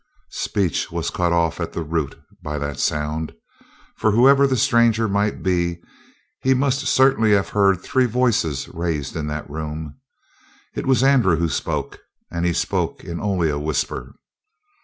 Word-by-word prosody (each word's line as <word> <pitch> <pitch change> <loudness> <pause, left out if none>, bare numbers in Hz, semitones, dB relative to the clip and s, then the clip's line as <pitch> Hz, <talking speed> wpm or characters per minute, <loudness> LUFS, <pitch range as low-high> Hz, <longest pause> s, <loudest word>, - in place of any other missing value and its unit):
Speech 95 -7 -1
was - - -2
cut 90 -1 0
off 85 -2 +1
at - - -4
the 85 - -3
root 80 -2 -3 0.2
by 75 -2 -4
that 70 -1 -4
sound. 75 +1 -2 0.6
For 110 - +1
whoever 135 +6 +5
the 130 -1 0
stranger 115 -1 +3
might 100 +1 -1
be, 85 -2 0 0.6
he 130 0 +2
must 140 +1 0
certainly 130 -6 +4
have 100 -1 +2
heard 100 -3 +3
three 130 -1 +2
voices 110 - 0
raised 80 -5 -3
in 75 -3 -3
that 75 0 -4
room. 75 -1 -6 0.7
It - - -4
was 130 -1 +3
Andrew 125 -10 +4
who 85 +1 0
spoke. 70 - -3 0.3
And 85 +1 -1
he 85 - +1
spoke - - -1
in 85 -1 -6
only 95 -6 +1
a 70 - -2
whisper. 75 -1 -3
85 Hz, 160 wpm, -21 LUFS, 80-115 Hz, 0.7 s, whoever